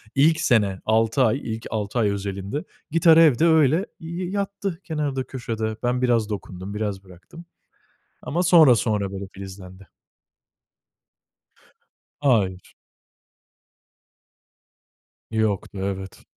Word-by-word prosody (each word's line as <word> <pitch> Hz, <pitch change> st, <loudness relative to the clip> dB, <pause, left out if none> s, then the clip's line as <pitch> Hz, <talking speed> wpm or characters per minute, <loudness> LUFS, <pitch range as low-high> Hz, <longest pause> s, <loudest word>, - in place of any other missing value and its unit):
ilk 155 Hz, +3 st, +4 dB
sene, 105 Hz, -9 st, +2 dB
6 115 Hz, +4 st, +2 dB
ay, 125 Hz, +3 st, +2 dB, 0.2 s
ilk 110 Hz, -, -11 dB
6 110 Hz, +2 st, -2 dB
ay 105 Hz, -2 st, +2 dB
özelinde 100 Hz, +6 st, -4 dB, 0.3 s
gitar 165 Hz, 0 st, +5 dB
evde 160 Hz, -2 st, +5 dB
öyle 160 Hz, +3 st, +4 dB
y 170 Hz, +3 st, -5 dB
yattı 200 Hz, -2 st, -3 dB
kenarda, 145 Hz, -5 st, -2 dB
köşede. 115 Hz, -4 st, -4 dB
Ben 125 Hz, +1 st, 0 dB
biraz 115 Hz, -4 st, +2 dB
dokundum, 95 Hz, -1 st, -6 dB
biraz 105 Hz, -2 st, -3 dB
bıraktım 95 Hz, -, -14 dB, 0.8 s
ama 175 Hz, +4 st, -1 dB
sonra 165 Hz, -8 st, +7 dB
sonra 105 Hz, -3 st, -1 dB
böyle 100 Hz, 0 st, -6 dB
filizlendi. 95 Hz, -1 st, -11 dB, 2.4 s
Hayır. 100 Hz, -9 st, 0 dB, 2.6 s
Yoktu, 105 Hz, -3 st, -1 dB
evet. 95 Hz, -1 st, -5 dB
115 Hz, 105 wpm, -23 LUFS, 100-155 Hz, 2.6 s, sonra